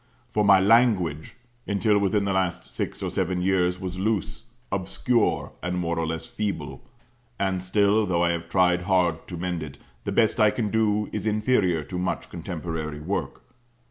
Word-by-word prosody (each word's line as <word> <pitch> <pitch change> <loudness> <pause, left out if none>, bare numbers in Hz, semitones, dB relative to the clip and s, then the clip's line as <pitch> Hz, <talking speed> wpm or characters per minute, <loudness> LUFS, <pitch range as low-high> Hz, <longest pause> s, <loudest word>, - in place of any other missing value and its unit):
For 105 -1 +1
my 100 -2 +7
"language," 95 -8 +3 0.3
until 105 +1 +2
within 100 +1 +1
the 100 - 0
last 90 -2 -1
six - - -4
or - - -2
seven 90 -1 -1
years, 90 -1 +1
was 95 -1 -5
loose, 110 +2 -2 0.3
obscure, 105 +5 0
and 90 +1 -2
more 85 -1 -1
or 80 - -1
less 80 0 -4
feeble; 110 -4 -4 0.6
and 95 -2 0
still, 100 +3 +2
though 85 -1 +1
I 85 - +3
have 85 0 -4
tried 90 -1 +3
hard 90 -3 +1
to 90 - -6
mend 90 -1 -3
it, 70 -2 -8 0.3
the - - -3
best 110 -2 +2
I 105 -1 +6
can 105 -1 -2
do 105 -1 +1
is 105 0 -3
inferior 105 -7 +2
to 90 +3 -5
much 90 - -2
contemporary 80 -3 -5
work. 90 +7 -4
95 Hz, 175 wpm, -25 LUFS, 85-105 Hz, 0.6 s, my